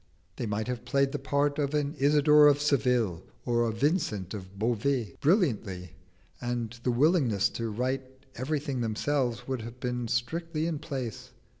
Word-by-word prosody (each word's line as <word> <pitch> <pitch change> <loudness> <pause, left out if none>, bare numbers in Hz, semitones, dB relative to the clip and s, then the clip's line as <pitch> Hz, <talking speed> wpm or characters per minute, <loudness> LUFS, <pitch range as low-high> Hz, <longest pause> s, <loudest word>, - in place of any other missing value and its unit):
They 115 - -3
might 105 +2 -2
have 125 -1 -3
played 135 +2 +1
the 145 - -3
part 145 +2 0
of 145 0 0
an 145 0 0
Isidor 150 +1 +6
of 145 -1 +4
Seville 125 - +1 0.2
or 120 -1 +2
a 115 -1 +1
Vincent 115 - 0
of 95 -1 -8
Beauvais 115 -1 0
brilliantly, 115 - +1 0.5
and 120 -2 -2
the 125 - -1
willingness 125 - +3
to 115 -1 -4
write 130 +4 -3
everything 140 0 -2
themselves 120 +2 -1
would 130 -3 -2
have 115 +2 -9
been 125 -1 -2
strictly 155 +7 -1
in 165 -3 -2
place. 135 -8 -5
130 Hz, 155 wpm, -29 LUFS, 115-145 Hz, 0.5 s, Isidor